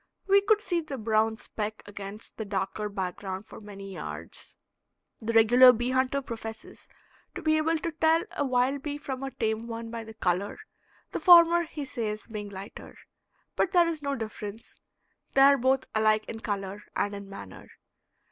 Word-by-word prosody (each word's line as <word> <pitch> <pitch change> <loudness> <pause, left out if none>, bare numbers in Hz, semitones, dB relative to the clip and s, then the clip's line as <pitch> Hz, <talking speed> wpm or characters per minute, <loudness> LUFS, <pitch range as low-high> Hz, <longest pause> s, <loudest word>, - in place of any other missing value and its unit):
We 400 0 +6
could 420 +1 +3
see 350 -4 0
the 290 -4 -6
brown 220 0 +1
speck 215 -1 -5
against 205 +1 -9
the 220 - -3
darker 210 +1 -3
background 190 0 -4
for - - -12
many 195 -2 -9
yards. - - -8 0.6
The 225 +1 -2
regular 240 +3 +8
bee 240 +2 -1
hunter 260 +2 +1
professes 225 -2 -8 0.5
to 365 - -6
be 310 0 +3
able 320 +1 +1
to 330 +2 -3
tell 320 +1 +3
a - - 0
wild 260 +1 +1
bee 290 0 -4
from 270 -3 -5
a 270 - -3
tame 225 -3 -2
one 230 0 -6
by 230 -1 -5
the 220 0 -11
color, 185 0 -1 0.5
the - - -3
former, 345 -1 +7
he 300 -3 -6
says, 215 -4 -4
being 210 -2 -6
lighter. 195 0 -10 0.6
But 385 - +1
there 350 -2 +5
is 325 -2 -2
no 280 -1 -1
difference; 215 -2 -7 0.6
they 270 - +6
are 280 +1 +7
both 260 +1 +2
alike 215 0 +3
in 225 - -6
color 200 -2 -4
and 205 - 0
in 200 -1 -8
manner. 100 - -10
230 Hz, 175 wpm, -28 LUFS, 210-280 Hz, 0.6 s, regular